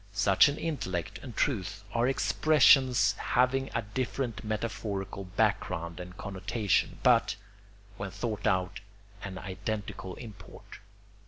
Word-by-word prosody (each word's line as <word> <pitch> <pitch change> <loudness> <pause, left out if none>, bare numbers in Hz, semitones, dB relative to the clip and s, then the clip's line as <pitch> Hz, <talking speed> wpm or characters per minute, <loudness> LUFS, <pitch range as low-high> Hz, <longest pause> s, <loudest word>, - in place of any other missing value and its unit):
Such 95 +5 +5
an 145 - -3
intellect 95 - -3
and 125 -5 -9
truth 105 -6 -1
are 120 +1 +2
expressions 130 -6 +4
having 130 +2 +1
a 115 - 0
different 120 +1 -3
metaphorical 105 -3 -3
background 90 -4 -1
and 90 0 -9
connotation, 100 +1 -1
but, - - +4 0.6
when 100 0 -4
thought 110 +2 -3
out, 95 0 0 0.4
an 95 -1 -6
identical 100 0 -5
import. 110 -5 -12
105 Hz, 110 wpm, -29 LUFS, 95-120 Hz, 0.6 s, Such